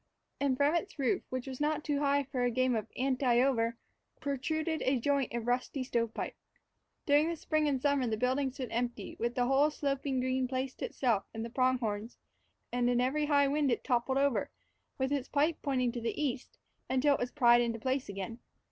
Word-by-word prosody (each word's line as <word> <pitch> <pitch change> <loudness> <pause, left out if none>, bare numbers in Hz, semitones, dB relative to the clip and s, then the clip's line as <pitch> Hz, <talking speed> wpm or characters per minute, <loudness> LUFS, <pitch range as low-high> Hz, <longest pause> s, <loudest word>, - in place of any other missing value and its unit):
And 275 -2 +1
from 285 +3 +3
its 345 +3 -2
roof, 265 -5 +1
which 255 -1 -3
was 265 0 -6
not 300 0 0
too 290 -2 0
high 285 0 +2
for 265 -2 -4
a 245 - +3
game 255 +1 +1
of 215 - -2
"anti 260 +1 0
I 240 - +5
over," 235 -3 +1 0.4
protruded 315 +3 -2
a 260 -1 +2
joint 280 0 +1
of 235 -1 -3
rusty 250 +2 -1
stovepipe. 230 -3 -2 0.7
During 305 +3 +3
spring 310 -1 0
and 275 -3 +1
summer 280 -2 +1
the 220 -1 -1
building 260 +3 +1
stood 255 -1 -6
empty, 240 -3 -3
with 235 +1 -1
the 245 - +2
whole 270 +4 +4
sloping 275 -2 -1
green 255 0 0
place 260 +1 -2
to - - -3
itself 230 -7 0
and 225 0 -3
the 230 - -7
pronghorns, 240 -4 0 0.5
and 245 0 +1
in 245 0 +2
every 285 +4 +1
high 285 -1 +4
wind 285 -1 +1
it - - -1
toppled 255 +1 +1
over, 280 -2 +1 0.5
with 265 0 -1
its 280 -2 -1
pipe 300 +3 +1
pointing 255 -4 +1
to 240 - -5
the 230 - -3
east, 275 -3 -3 0.3
until 265 +3 +3
it - - -1
was 245 - -1
pried 240 -3 +5
into 230 -1 -1
place 260 +2 -2
again. 200 +4 -5
260 Hz, 200 wpm, -32 LUFS, 245-285 Hz, 0.7 s, I